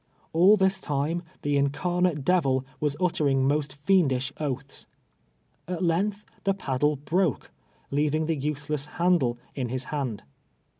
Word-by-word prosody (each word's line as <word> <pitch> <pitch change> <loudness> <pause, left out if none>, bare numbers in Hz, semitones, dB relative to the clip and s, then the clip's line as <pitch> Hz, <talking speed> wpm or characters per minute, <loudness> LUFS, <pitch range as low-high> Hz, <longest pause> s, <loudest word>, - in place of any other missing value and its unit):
All 185 +6 +6
this 190 0 +2
time, 150 +2 -1 0.2
the 145 -1 +1
incarnate 150 +2 0
devil 135 -7 +2
was 145 -1 0
utter 170 -5 +1
ing 135 -1 +2
most 145 -1 0
fiendish 140 -4 +1
oaths. 140 -2 -4 0.8
At 180 0 -3
length 200 +5 0 0.2
the 195 -1 +1
paddle 145 -3 0
Ijroke, 155 - 0 0.4
leaving 150 +2 +1
the 165 0 0
useless 150 0 -2
handle 170 -9 +2 0.2
in 125 -3 -3
his 130 +1 -1
hand. 130 -8 -2
150 Hz, 135 wpm, -26 LUFS, 135-175 Hz, 0.8 s, All